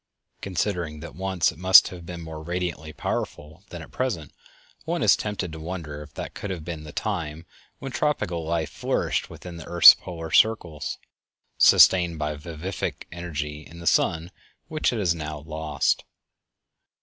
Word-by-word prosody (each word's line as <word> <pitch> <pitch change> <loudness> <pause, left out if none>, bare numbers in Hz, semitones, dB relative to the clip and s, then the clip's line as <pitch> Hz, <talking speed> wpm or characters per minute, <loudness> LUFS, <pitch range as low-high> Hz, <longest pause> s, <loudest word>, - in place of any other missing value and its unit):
Considering 85 -3 -2
that 85 - -9
once 95 -2 0
it 75 - -16
must 95 +1 +8
have 85 -2 -10
been 85 -1 -7
more 80 -1 -8
radiantly 85 -2 -4
powerful 75 +2 -5
than 85 -2 -8
at - - -14
present, 110 - -3 0.5
one - - -2
is - - +6
tempted 100 -4 -4
to 80 - -8
wonder 80 -3 -6
if 75 -1 -11
that - - -6
could 105 - -6
have 85 -5 -5
been 80 -3 -6
the 75 - -9
time 80 0 -4 0.3
when 135 - -7
tropical 105 - -1
life 80 0 -2
flourished - - -1
within 90 -2 -9
the 85 - -9
earth's 85 -1 +10
polar 80 -3 -8
circles, 85 -9 +2 0.6
sustained 90 -3 +6
by 75 0 -2
a - - -5
vivific 85 +5 -5
energy 75 -4 -5
in 85 - -14
the 85 - -9
sun 85 +2 +2 0.4
which 155 -1 +1
it 120 - -3
has 90 -6 +2
now 75 -2 -5
lost. 75 -2 -1
85 Hz, 165 wpm, -25 LUFS, 80-90 Hz, 0.6 s, earth's